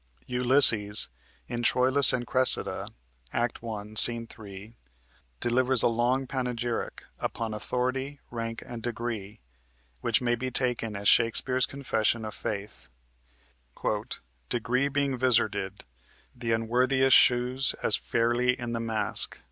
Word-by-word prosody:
Ulysses, 125 -5 +4 0.4
in 120 -1 -4
"Troilus 130 +3 +3
and 120 -1 -2
Cressida" 130 +1 +1 0.4
(Act 120 0 -2
1, 110 -2 -7
Sc. 110 - +4 0.2
3), 105 +1 -11 0.6
delivers 125 0 +2
a - - +5
long 120 +3 +1
panegyric 125 -2 -3 0.2
upon 115 -1 -3
authority, 130 +5 -3
rank, 115 -1 -5
and 120 -2 -8
degree, 115 -3 -5 0.6
which 115 +6 +1
may 120 -1 0
be 125 +2 -2
taken 120 -4 0
as 100 +1 -3
Shakespeare's 125 +2 +3
confession 115 -4 -1
of 110 - -6
faith: 100 -9 -6 1.6
"Degree 125 +4 0
being 140 -2 -1
vizarded, 105 -6 +1 0.5
Th' 120 -1 -10
unworthiest 125 +4 +3
shews 125 +2 +4
as - - +4
fairly 120 +2 0
in 120 -1 -4
the 115 - -2
mask. 115 -1 -1
120 Hz, 115 wpm, -27 LUFS, 115-130 Hz, 1.6 s, a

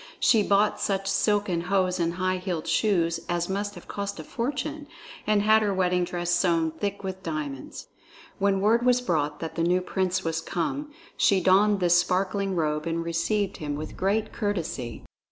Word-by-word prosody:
She 225 - +5
bought 205 +1 +2
such 195 -1 -1
silken 200 -3 +1
hose 185 0 +1
and 170 0 0
high 185 0 0
heeled 180 -3 -3
shoes 170 -6 +1
as 175 0 0
must 205 +1 -3
have 175 - -12
cost 200 -2 -4
a - - -5
fortune, 290 - -4 0.4
and 210 -1 +3
had 220 +1 +5
her 210 -2 +1
wedding 180 -1 +2
dress 175 0 -2
sewn 170 -2 +2
thick 200 +5 -4
with 190 0 -5
diamonds. 150 -6 -5 0.5
When 195 -1 +2
word 225 +4 +3
was 250 0 +4
brought 150 -10 -1
that 165 - -4
the 165 - -2
new 180 +2 +3
prince 185 0 -1
was 165 0 -1
come, 275 - -3 0.3
she 195 - +4
donned 195 +2 +4
this 175 0 +5
sparkling 190 +2 0
robe 155 -1 -1
and 165 0 -1
received 190 +5 -1
him 145 -2 -4
with 155 +1 -6
great 210 +3 0
courtesy. 170 - -3
185 Hz, 175 wpm, -26 LUFS, 170-205 Hz, 0.5 s, She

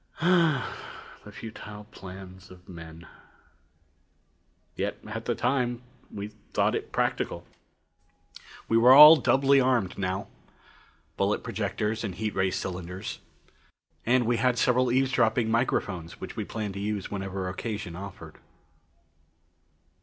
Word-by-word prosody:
Ah, 165 -7 +2 0.5
the - - -11
futile 105 -2 -9
plans 95 0 -11
of 90 -1 -16
men! 80 -1 -11 1.7
Yet, - - -2
at - - -6
the - - 0
time, 125 -2 0 0.3
we 100 0 -6 0.2
thought - - +2
it - - -4
practical. - - -1 1.2
We 115 - +3
were 125 +3 +8
all 150 +3 +11
doubly 135 -1 +4
armed 120 -9 +1
now. 95 +1 -2 0.9
Bullet - - 0
projectors 110 +2 -2
and 100 -5 -4
heat 110 -1 -3
ray 95 0 +1
cylinders. 90 0 -5 0.8
And 125 +1 +3
we 120 +1 +1
had 125 0 +2
several 125 +1 +2
eavesdropping 120 -3 +2
microphones 95 -8 -1
which - - -7
we - - -3
planned 105 -3 -4
to 100 - -6
use 105 -1 -3
whenever 95 -2 -4
occasion 95 -2 -5
offered. 100 +1 -9
105 Hz, 120 wpm, -27 LUFS, 95-125 Hz, 1.7 s, all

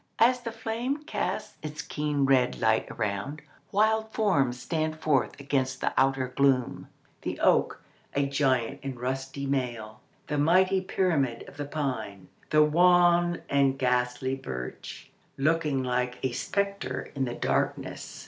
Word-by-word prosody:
As 250 +2 +4
the 230 - -5
flame 230 +6 -3
casts 310 - -3
its 150 -1 -6
keen 150 -2 -1
red 130 -2 +3
light 110 0 +2
around, 105 +8 -3 0.3
wild 220 +2 +2
forms 140 - +1
stand 155 +2 -2
forth 150 -4 +1
against 135 -2 -1
the - - -1
outer 135 -1 +2
gloom—the 130 -1 -1
oak, - - +3 0.4
a 140 0 +2
giant 135 -2 +1
in 135 -3 -5
rusty 135 +2 -3
mail; 120 -6 -3 0.2
the 150 -1 -2
mighty 185 +5 +4
pyramid 155 -11 0
of 140 - -13
the 145 - -3
pine; 115 -11 -4 0.2
the 155 0 +5
wan 175 +2 +4
and 140 -1 +2
ghastly 125 0 0
birch, 65 - -7 0.3
looking 150 -2 +1
like 125 0 -1
a 130 - +1
spectre 200 +9 -2
in 135 -2 -1
the 120 -1 -4
darkness. - - -2
140 Hz, 135 wpm, -28 LUFS, 125-165 Hz, 0.4 s, the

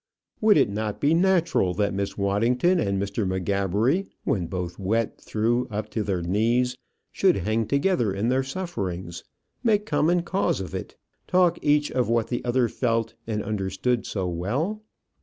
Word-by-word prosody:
Would 215 -4 +5
it 130 -8 +3
not 105 0 -3
be 145 +2 +3
natural 170 - +2
that 105 -1 0
Miss 100 0 -3
Waddington 115 - +2
and 100 -5 0
Mr. 100 +2 -2
M'Gabbery, 100 - 0 0.2
when 95 -11 0
both 90 0 -5
wet 110 +4 -1
through 115 +3 0
up 105 0 -4
to 110 - -1
their 95 -4 -1
knees, 115 +7 +1 0.4
should - - +3
hang 110 +4 0
together 140 - +1
in 100 +5 -1
their 130 +1 +2
sufferings, 95 - -4 0.4
make 210 -3 +2
common 175 -4 +2
cause 190 - 0
of 95 -1 -6
it, 95 - -6 0.3
talk 180 -2 +3
each 150 0 +2
of 125 -3 0
what 115 -1 +1
the 120 - -2
other 125 0 +2
felt 115 -1 -1
and 110 -2 -2
understood 105 +4 -1
so 95 -3 -2
well? 125 - -2
115 Hz, 160 wpm, -25 LUFS, 100-140 Hz, 0.4 s, Would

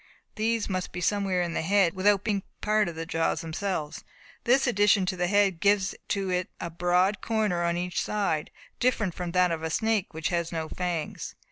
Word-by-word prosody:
These 225 0 0
must 185 -2 -3
be 180 - -5
somewhere 190 -1 +1
in 170 -1 -3
the - - -1
head, 190 0 +3
without 200 +1 +3
being 205 -3 0 0.2
part 210 -3 +2
of 170 - -8
the 165 0 -4
jaws 165 -1 0
themselves. 165 -2 -3 0.4
This 260 +3 +4
addition 205 -4 +3
to 185 +1 -1
the 180 -1 0
head 200 -3 +2
gives 200 0 +2
to 195 -2 -1
it 180 +2 -1
a 170 - -5
broad 180 +4 +2
corner 215 -6 0
on 170 0 0
each 180 0 -2
side, 195 -8 -1 0.3
different 225 -7 +1
from 175 0 -4
that 180 -1 +3
of 165 -1 -2
a 160 - -2
snake 220 +2 0
which 160 0 -2
has 170 -2 -1
no 160 -2 -3
fangs. 175 -3 -4
185 Hz, 200 wpm, -27 LUFS, 170-205 Hz, 0.4 s, This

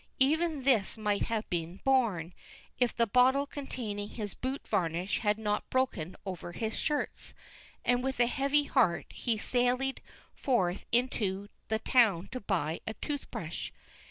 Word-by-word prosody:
Even 310 +1 +2
this 235 -6 +3
might 210 -2 +1
have 225 -1 -2
been 170 +1 -2
borne, 215 -11 +2 0.5
if 245 -3 +3
the 235 - +2
bottle 255 +5 +4
containing 225 -8 -5
his 210 -4 -5
boot 260 +2 -4
varnish 175 +2 0
had 210 -2 +2
not 210 -1 -1
broken 255 -10 0
over 180 -2 -5
his 220 +4 -2
shirts; 300 -2 -2 0.5
and 245 0 +3
with 265 -1 -2
a 240 - +6
heavy 280 +3 +2
heart 240 -12 +2
he 235 -3 -1
sallied 250 +4 +1 0.3
forth 195 - 0
into 205 -5 0 0.2
the 220 - +1
town 220 -6 +3
to 255 - -4
buy 170 -7 -1
a 220 - -3
tooth 290 -2 -4
brush. - - -5
230 Hz, 150 wpm, -31 LUFS, 200-260 Hz, 0.5 s, a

